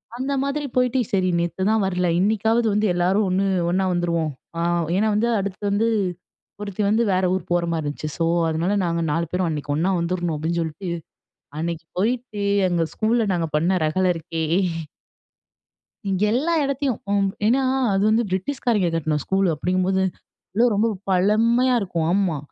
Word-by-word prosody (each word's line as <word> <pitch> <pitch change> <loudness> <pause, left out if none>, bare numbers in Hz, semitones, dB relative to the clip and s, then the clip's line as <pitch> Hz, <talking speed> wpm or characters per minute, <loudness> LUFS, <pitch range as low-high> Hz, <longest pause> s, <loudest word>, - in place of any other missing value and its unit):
அந்த 265 +3 -2
மாதிரி 285 +1 -2
போயிட்டு 250 0 +2
சரி 185 -2 +2
நேத்துதான் 190 +6 0
வரல 180 -1 0
இன்னிக்காவது 220 +3 +2
வந்து 210 +1 +1
எல்லாரும் 185 +4 +2
ஒண்ணு 190 +2 +1 0.2
ஒன்னா 190 +2 +1
வந்துருவோம். 170 -2 0 0.3
ஆ - - -2 0.4
ஏன்னா 210 +3 +2
வந்து 220 +3 +2
அடுத்து 195 0 -4
வந்து 205 +3 +1 0.7
ஒருத்தி 205 0 -4
வந்து 220 +3 +3
வேற 185 +1 +1
ஊர் 185 -2 -1
போற 175 0 +2
மாரி 165 -2 -1
இருந்துச்சு. 145 +1 -4
ஸோ, 165 - +1 0.2
அதனால 165 +5 0
நாங்க 170 0 -1
4 165 +3 0
பேரும் 180 0 0
அன்னைக்கு 145 -2 -3
ஒன்னா 170 +5 +1
வந்துடணும் 175 -1 -1
அப்டின்னு 160 +3 -2
சொல்ட்டு. 165 +3 -5 0.7
அன்னைக்கு 165 0 -4
போயிட்டு 230 0 -1 0.3
எங்க 175 -2 +1
ஸ்கூல்ல 225 +1 +1
நாங்க 170 -2 0
பண்ண 175 +5 +2
ரகள 155 +5 +1
இருக்கே. 165 0 -4 1.7
இங்கே 195 +2 +1
எல்லா 305 +8 +1
இடத்தையும். 275 -3 -1
ஒ - - +2 0.3
ஏன்னா 255 +5 +3 0.3
அது 195 - +1
வந்து 225 +2 +3
பிரிட்டிஷ்காரங்க 210 -2 0
கட்டண 155 -1 0
ஸ்கூலு 190 0 +1
அப்டிங்கும்போது 185 +4 0 0.6
அது 240 +2 +5
ரொம்ப 215 +3 +2 0.2
பழமையா 225 +7 +3
இருக்கும். 170 -4 -2
ஆமா, 185 -5 +1
190 Hz, 155 wpm, -22 LUFS, 170-220 Hz, 1.7 s, அது